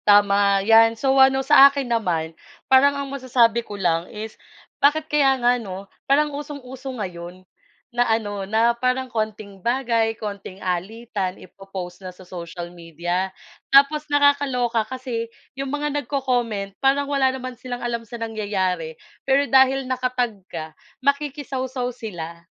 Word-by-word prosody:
Tama 200 Hz, -1 st, +4 dB
'yan. 225 Hz, +1 st, +6 dB
So 270 Hz, +3 st, +1 dB
ano 265 Hz, 0 st, +4 dB
sa 275 Hz, +1 st, +9 dB
akin 280 Hz, -1 st, -3 dB
naman 175 Hz, -9 st, -1 dB, 0.3 s
parang 280 Hz, +2 st, +5 dB
ang 280 Hz, -, -3 dB
masasabi 240 Hz, -3 st, +2 dB
ko 205 Hz, -3 st, -9 dB
lang 170 Hz, -2 st, 0 dB
is 215 Hz, +1 st, -7 dB, 0.5 s
bakit 300 Hz, +2 st, +3 dB
kaya 285 Hz, -4 st, +3 dB
nga 245 Hz, 0 st, +2 dB
'no, 195 Hz, -2 st, -7 dB, 0.2 s
parang 295 Hz, +1 st, +3 dB
usong-uso 275 Hz, -2 st, -7 dB
ngayon 180 Hz, -2 st, -7 dB, 0.5 s
na 245 Hz, 0 st, +2 dB
ano 205 Hz, -3 st, -1 dB
na 225 Hz, +2 st, +3 dB
parang 255 Hz, +1 st, -1 dB
konting 215 Hz, -3 st, -4 dB
bagay 235 Hz, -1 st, +1 dB
konting 200 Hz, -3 st, -7 dB
alitan 190 Hz, +1 st, -3 dB
i-po-post 190 Hz, -2 st, -9 dB
na 185 Hz, -, -7 dB
sa 180 Hz, +1 st, -14 dB
social 175 Hz, -1 st, -8 dB
media. 175 Hz, +2 st, -3 dB, 0.4 s
Tapos 295 Hz, +2 st, +4 dB
nakakaloka 280 Hz, -5 st, +2 dB
kasi 250 Hz, -3 st, -4 dB, 0.2 s
'yong 270 Hz, 0 st, -4 dB
mga 295 Hz, +1 st, -2 dB
nag-co-comment 245 Hz, -8 st, -2 dB
parang 275 Hz, +1 st, +3 dB
wala 275 Hz, -2 st, +2 dB
naman 255 Hz, -1 st, -5 dB
silang 245 Hz, 0 st, -7 dB
alam 235 Hz, -1 st, -2 dB
sa 230 Hz, +1 st, -9 dB
nangyayari, 195 Hz, -7 st, -2 dB, 0.2 s
pero 275 Hz, +1 st, +2 dB
dahil 270 Hz, 0 st, +4 dB
naka-tag 255 Hz, -2 st, -1 dB, 0.2 s
ka 160 Hz, -1 st, -6 dB, 0.3 s
makikisawsaw 270 Hz, -3 st, -1 dB
sila. 170 Hz, -8 st, -7 dB
235 Hz, 140 wpm, -22 LUFS, 195-265 Hz, 0.5 s, sa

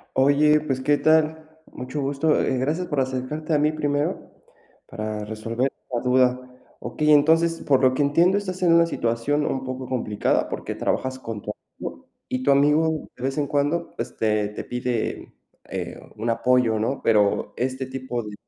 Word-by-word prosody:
Oye, 145 Hz, +3 st, +4 dB
pues, 135 Hz, -4 st, -2 dB
¿qué 145 Hz, +2 st, +3 dB
tal? 155 Hz, 0 st, +2 dB, 0.2 s
Mucho 130 Hz, +4 st, -5 dB
gusto, 140 Hz, +3 st, +1 dB
eh, 130 Hz, -, 0 dB
gracias 160 Hz, +7 st, -1 dB
por 145 Hz, -3 st, 0 dB
acercarte 130 Hz, +5 st, -3 dB
a -, -, +3 dB
mí 150 Hz, +1 st, +2 dB
primero 145 Hz, -1 st, -2 dB, 0.5 s
para 110 Hz, -2 st, -5 dB
resolver 115 Hz, +4 st, -2 dB, 0.2 s
la 120 Hz, -, 0 dB
duda. 125 Hz, 0 st, +3 dB, 0.4 s
Okey, 150 Hz, +5 st, +1 dB
entonces, 165 Hz, +3 st, +4 dB
por 135 Hz, -2 st, +2 dB
lo 130 Hz, 0 st, +4 dB
que 145 Hz, -, +1 dB
entiendo, 170 Hz, +7 st, +3 dB
estás 185 Hz, -2 st, -5 dB
en 170 Hz, -2 st, +4 dB
una 170 Hz, 0 st, +6 dB
situación 130 Hz, +2 st, 0 dB
un 130 Hz, 0 st, -2 dB
poco 130 Hz, 0 st, -5 dB
complicada 115 Hz, -5 st, 0 dB
porque -, -, -5 dB
trabajas 130 Hz, 0 st, -2 dB
con 115 Hz, -5 st, -6 dB
tu -, -, -5 dB, 0.3 s
amigo, -, -, -8 dB, 0.2 s
y 130 Hz, 0 st, -2 dB
tu 140 Hz, -, +2 dB
amigo 150 Hz, +3 st, +3 dB
de -, -, -12 dB
vez 135 Hz, +2 st, -2 dB
en 145 Hz, -, +1 dB
cuando 145 Hz, +5 st, -1 dB
este 105 Hz, -2 st, -1 dB
te 105 Hz, -, -7 dB
pide, 125 Hz, -2 st, -3 dB, 0.4 s
eh, -, -, -5 dB, 0.2 s
un 115 Hz, +2 st, -2 dB
apoyo, 115 Hz, -1 st, +2 dB
¿no?, 130 Hz, +5 st, -1 dB
pero 105 Hz, -1 st, +2 dB
este 130 Hz, +1 st, -2 dB
tipo 130 Hz, -2 st, -4 dB
de 105 Hz, -1 st, -8 dB
135 Hz, 170 wpm, -24 LUFS, 125-150 Hz, 0.5 s, una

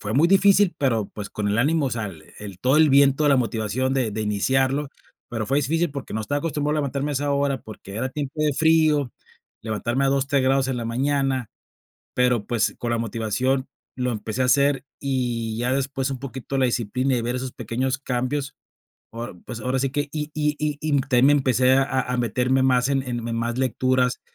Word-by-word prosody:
Fue 105 Hz, +1 st, -4 dB
muy 160 Hz, +6 st, +4 dB
difícil, 195 Hz, -1 st, +5 dB
pero, 115 Hz, -7 st, +1 dB
pues, 105 Hz, -2 st, -7 dB
con 105 Hz, -1 st, -2 dB
el 105 Hz, -, 0 dB
ánimo, 150 Hz, +3 st, +2 dB
o -, -, -2 dB
sea, 110 Hz, -2 st, -2 dB
el 80 Hz, -5 st, -10 dB
el 100 Hz, -3 st, -9 dB
todo 130 Hz, +9 st, +2 dB
el 155 Hz, -2 st, +5 dB
viento, 140 Hz, +2 st, +4 dB
la 140 Hz, -, +5 dB
motivación 120 Hz, +2 st, -1 dB
de 125 Hz, -5 st, 0 dB
de 110 Hz, -, -4 dB
iniciarlo, 130 Hz, +7 st, +1 dB, 0.4 s
pero 115 Hz, -3 st, -3 dB
fue 135 Hz, +2 st, +2 dB
difícil, 160 Hz, +3 st, 0 dB
porque 140 Hz, -5 st, -7 dB
no 110 Hz, -, -1 dB
estaba 145 Hz, +7 st, -1 dB
acostumbrado 150 Hz, -1 st, -1 dB
levantarme 140 Hz, 0 st, -1 dB
a -, -, -2 dB
esa 145 Hz, +1 st, -1 dB
hora, 140 Hz, -2 st, 0 dB
porque 100 Hz, -2 st, -10 dB
era 130 Hz, +3 st, -1 dB
tiempo 140 Hz, 0 st, -4 dB
de 150 Hz, -, +2 dB
frío, 155 Hz, -4 st, +3 dB, 0.5 s
levantarme 120 Hz, +4 st, -1 dB
a -, -, +3 dB
2, 135 Hz, 0 st, +1 dB
3 140 Hz, -1 st, +1 dB
grados 135 Hz, 0 st, +2 dB
en 130 Hz, -, -1 dB
la 115 Hz, -, -4 dB
mañana, 135 Hz, 0 st, 0 dB, 0.6 s
pero, 125 Hz, -4 st, +2 dB
pues, 115 Hz, -3 st, 0 dB
con 120 Hz, -1 st, -2 dB
la 115 Hz, -, +1 dB
motivación 115 Hz, +4 st, -1 dB, 0.3 s
lo 125 Hz, -1 st, -1 dB
empecé 110 Hz, +2 st, -3 dB
a -, -, +3 dB
hacer. 140 Hz, +1 st, +3 dB, 0.2 s
Y 120 Hz, -5 st, -2 dB
ya 125 Hz, +2 st, 0 dB
después 135 Hz, 0 st, -1 dB
un 135 Hz, -, -4 dB
poquito 135 Hz, 0 st, -5 dB
la 130 Hz, -, +3 dB
disciplina, 125 Hz, +3 st, 0 dB
y 120 Hz, -, 0 dB
ver 120 Hz, +2 st, -2 dB
esos 130 Hz, 0 st, -4 dB
pequeños 125 Hz, +3 st, -2 dB
cambios, 135 Hz, +2 st, -2 dB, 0.6 s
ahora 115 Hz, -3 st, -6 dB
pues, 120 Hz, -2 st, -6 dB
ahora 130 Hz, +3 st, -1 dB
sí 135 Hz, 0 st, 0 dB
que, 145 Hz, +1 st, -2 dB
y 150 Hz, 0 st, -4 dB
y 150 Hz, -1 st, 0 dB
y 150 Hz, -1 st, 0 dB
también 130 Hz, -1 st, +3 dB
me 145 Hz, -, +6 dB
empecé 130 Hz, -2 st, +3 dB
a 130 Hz, -2 st, 0 dB
meterme 125 Hz, +3 st, +1 dB
más 125 Hz, -1 st, +3 dB
en 135 Hz, -1 st, +1 dB
en 120 Hz, -2 st, -4 dB
más 115 Hz, +1 st, -2 dB
lecturas 130 Hz, 0 st, +1 dB
130 Hz, 205 wpm, -23 LUFS, 120-140 Hz, 0.6 s, me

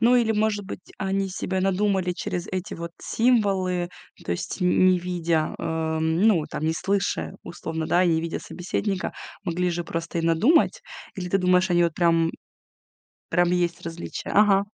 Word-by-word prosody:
Ну 240 Hz, +2 st, +5 dB
или 225 Hz, -2 st, +3 dB
может 210 Hz, -1 st, 0 dB
быть, 190 Hz, -2 st, -9 dB
они 195 Hz, 0 st, -1 dB
себе 190 Hz, 0 st, -2 dB
надумали 190 Hz, -1 st, +1 dB
через 180 Hz, 0 st, -4 dB
эти 185 Hz, -1 st, -4 dB
вот 170 Hz, 0 st, -6 dB
символы, 195 Hz, -7 st, +1 dB, 0.4 s
то -, -, -5 dB
есть 85 Hz, -, -4 dB
н 180 Hz, +1 st, +4 dB
не 185 Hz, -1 st, +5 dB
видя, 170 Hz, -3 st, -1 dB
э, -, -, -8 dB
м, 160 Hz, +1 st, 0 dB
ну, 200 Hz, -8 st, +4 dB
там -, -, -4 dB
не 160 Hz, -, +2 dB
слыша 195 Hz, +4 st, -1 dB
условно, 160 Hz, -1 st, -5 dB
да, 180 Hz, -, +3 dB
и -, -, +3 dB
не 160 Hz, -1 st, +2 dB
видя 165 Hz, 0 st, -3 dB
собеседника, 190 Hz, +2 st, -3 dB, 0.3 s
могли 180 Hz, 0 st, 0 dB
же 170 Hz, 0 st, -3 dB
просто 165 Hz, +1 st, -4 dB
и -, -, -1 dB
надумать. 170 Hz, -, +3 dB, 0.3 s
Или 180 Hz, -2 st, -5 dB
ты 195 Hz, -, +2 dB
думаешь, 180 Hz, +1 st, +3 dB
они 175 Hz, 0 st, +4 dB
вот 165 Hz, -, 0 dB
прям 165 Hz, -1 st, +3 dB, 1.0 s
прям 175 Hz, 0 st, +2 dB
есть 175 Hz, -1 st, 0 dB
различия? 170 Hz, 0 st, -6 dB
Ага. 200 Hz, -1 st, +4 dB
180 Hz, 175 wpm, -25 LUFS, 170-195 Hz, 1.0 s, Ну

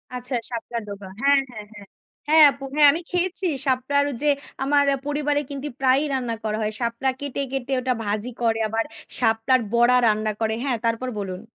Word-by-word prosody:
আচ্ছা 250 Hz, +1 st, 0 dB
শাপলার 235 Hz, 0 st, -5 dB
ডোগা। 200 Hz, -1 st, -8 dB
হ্যাঁ, 280 Hz, 0 st, +5 dB
হ্যাঁ, 215 Hz, -3 st, -9 dB
হ্যাঁ। 205 Hz, -1 st, -12 dB, 0.4 s
হ্যাঁ, 315 Hz, +1 st, +7 dB
আপু 275 Hz, -, -12 dB
হ্যাঁ, 295 Hz, -1 st, +7 dB
আমি 325 Hz, +4 st, -3 dB
খেয়েছি 360 Hz, +2 st, -1 dB, 0.2 s
শাপলার 270 Hz, +2 st, +1 dB, 0.2 s
যে 295 Hz, -, +2 dB, 0.3 s
আমার 285 Hz, +1 st, +3 dB, 0.2 s
পরিবারে 290 Hz, 0 st, 0 dB
কিন্তু 280 Hz, +1 st, -5 dB
প্রায়ই 270 Hz, +3 st, +3 dB
রান্না 245 Hz, -3 st, -2 dB
করা 215 Hz, -1 st, -2 dB
হয়। 215 Hz, -, -1 dB
শাপলা 235 Hz, +2 st, -1 dB
কেটে, 285 Hz, -1 st, -3 dB
কেটে 270 Hz, 0 st, -3 dB
ওটা 255 Hz, 0 st, 0 dB
ভাজি 210 Hz, +3 st, -2 dB
করে, 225 Hz, -1 st, +1 dB
আবার 225 Hz, +1 st, -1 dB, 0.3 s
শাপলার 225 Hz, +4 st, +2 dB
বড়া 240 Hz, +1 st, +5 dB
রান্না 215 Hz, 0 st, +1 dB
করে 220 Hz, 0 st, +1 dB
হ্যাঁ 265 Hz, -4 st, 0 dB
তারপর 230 Hz, +3 st, -1 dB
বলুন। 190 Hz, -2 st, -5 dB
255 Hz, 175 wpm, -23 LUFS, 225-280 Hz, 0.4 s, হ্যাঁ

